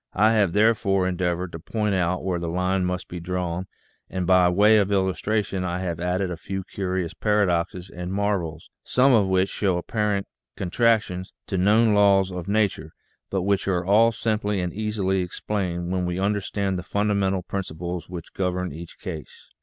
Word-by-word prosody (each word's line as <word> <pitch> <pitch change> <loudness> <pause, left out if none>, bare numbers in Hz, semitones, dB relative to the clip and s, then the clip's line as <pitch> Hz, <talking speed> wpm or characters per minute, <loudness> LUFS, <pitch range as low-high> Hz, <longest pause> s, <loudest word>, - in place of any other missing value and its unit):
I 110 +4 +4
have 100 -6 +2
therefore 105 -3 +3
endeavored 90 -1 -1
to 80 - -7
point 105 +4 -1
out 90 -1 0
where 90 -2 0
the 85 - -4
line 90 +2 0
must 90 0 -3
be 90 - -6
drawn, 90 +1 -3 0.4
and 95 -1 -2
by 90 0 +5
way 105 +4 +5
of 100 0 +1
illustration 100 0 0
I 90 -1 -2
have 85 -3 -3
added 90 +1 -1
a 85 - -4
few 95 +2 -5
curious 95 -2 -3
paradoxes 90 -4 0
and 90 0 -6
marvels, 95 -6 -2
some 130 +1 +3
of 105 -5 +4
which 95 0 +2
show 95 -4 0
apparent 105 +1 -1 0.3
contradictions 95 -2 +1
to 95 - -4
known 105 +4 +4
laws 100 -2 +4
of 90 -1 -6
nature, 100 -7 0 0.4
but 95 -2 -1
which 100 0 +1
are 90 -2 0
all 110 +4 +5
simply 105 -2 -1
and 90 -2 -2
easily 100 -3 0
explained 90 -1 -3
when 90 -1 0
we 90 0 -2
understand 100 -1 -1
the - - -4
fundamental 100 -1 0
principles 90 -2 -5
which 85 -2 -8
govern 90 -1 -1
each 85 +3 -9
case. 85 -7 -8
95 Hz, 170 wpm, -24 LUFS, 90-100 Hz, 0.4 s, by